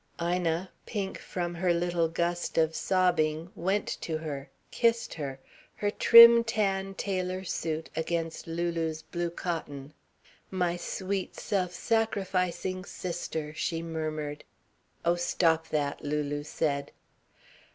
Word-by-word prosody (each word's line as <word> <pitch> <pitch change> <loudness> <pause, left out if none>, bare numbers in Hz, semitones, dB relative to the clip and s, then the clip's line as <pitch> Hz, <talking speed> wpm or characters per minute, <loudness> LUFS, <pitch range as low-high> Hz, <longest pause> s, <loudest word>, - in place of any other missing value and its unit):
Ina, 175 +1 0 0.2
pink 200 -4 -3
from 175 -1 -3
her 175 0 +1
little 170 -1 +1
gust 170 +1 -2
of 160 0 +3
sobbing, 170 -3 +1
went 195 +2 0 0.2
to 160 -2 -2
her, 145 -3 -5 0.2
kissed 230 0 +2
her, 140 -4 -5 0.4
her 205 0 -1
trim 235 +1 +9
tan 195 -4 0
tailor 185 -1 -2
suit 160 -3 -3
against 165 0 -2
Lulu's 165 -1 -2
blue 175 +1 -3
cotton. 155 -5 -5 0.6
"My 180 -2 0
sweet, 190 +2 -3
self 185 -4 -1
sacrificing 185 -4 0
sister," 160 -5 -4
she 165 +1 -2
murmured. 155 -2 -4 0.6
"Oh 170 +1 +3
stop 165 -2 +2
that!" 145 -2 -1
Lulu 145 0 -1
said. 140 -2 -1
170 Hz, 115 wpm, -29 LUFS, 160-185 Hz, 0.6 s, trim